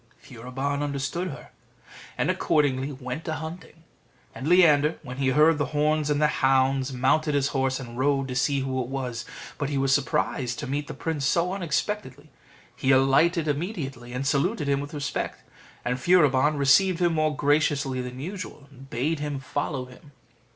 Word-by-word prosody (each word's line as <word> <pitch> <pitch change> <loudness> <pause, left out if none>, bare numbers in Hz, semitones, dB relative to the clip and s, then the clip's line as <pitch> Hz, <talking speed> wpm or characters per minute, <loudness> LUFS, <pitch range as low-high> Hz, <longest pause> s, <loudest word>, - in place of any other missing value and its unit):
Furibon 135 +4 -4
understood 145 +5 -2
her, 145 - -9 0.7
and - - +2
accordingly 140 -2 +1
went 130 +4 -6
a 160 - -1
hunting; 160 0 -8 0.5
and 135 - -6
Leander, 155 -4 +5
when 125 -2 -8
he 135 -1 0
heard 150 +4 +4
the 145 - 0
horns 150 0 +2
and 145 -1 +1
the 150 - +4 0.2
hounds, 135 0 +2
mounted 140 +4 +1
his 140 -1 +2
horse, 130 -1 0
and 120 -2 -8
rode 135 0 +1
to 125 - -5
see 140 +2 +1
who 130 -1 -2
it 120 - -4
was. 125 -3 -4 0.3
But 145 -1 -1
he 145 - -1
was 135 0 +2
surprised 130 -3 0
to - - -4
meet 145 +2 -3
the - - -7
prince 160 -4 -3
so 175 +4 +1
unexpectedly: 155 -5 -3 0.4
he 130 - -2
alighted 140 +6 +4
immediately, 140 - -3
and 125 +2 -3
saluted 150 +4 0
him 140 -1 +2
with 145 +2 -6
respect; 145 -2 -4 0.4
and 125 +1 -1
Furibon 150 -2 +4
received 145 +7 +4
him 175 -2 +2
more 155 -1 +1
graciously 145 -2 +1
than 125 0 -7
usual, 170 -2 -7
and 135 0 -14
bade 145 +7 -1
him 145 -2 -3
follow 135 0 -3
him. 130 +3 -16
140 Hz, 170 wpm, -26 LUFS, 130-155 Hz, 0.7 s, Leander